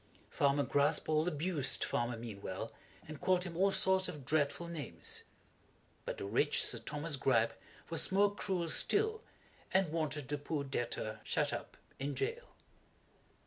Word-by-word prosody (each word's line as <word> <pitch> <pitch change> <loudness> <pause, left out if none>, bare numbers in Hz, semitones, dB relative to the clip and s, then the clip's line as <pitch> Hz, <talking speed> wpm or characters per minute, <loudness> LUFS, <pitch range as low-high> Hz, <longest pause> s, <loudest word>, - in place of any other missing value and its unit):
Farmer 140 0 +3
Graspall 155 +3 +2
abused 155 -3 +1
Farmer 120 0 -1
Meanwell 100 -5 -6 0.4
and 155 -2 -8
called 185 -1 +3
him 175 -3 -5
all 195 +3 +4
sorts 190 -1 +3
of 145 -4 -8
dreadful 155 +3 +1
names; 160 -7 -4 0.8
but - - -3
the - - -4
rich 125 +9 +2
Sir 115 - +2
Thomas 150 +6 -2
Gripe 130 -4 +3 0.4
was 165 - +1
more 200 +1 +4
cruel 185 -4 -1
still, 440 - +3 0.5
and 190 -4 +3
wanted 155 -4 -2
the 145 0 -1
poor 145 0 -2
debtor 120 -5 -3
shut - - 0
up - - -6 0.2
in 140 +1 -2
jail. 475 +3 -3
150 Hz, 145 wpm, -35 LUFS, 140-180 Hz, 0.8 s, all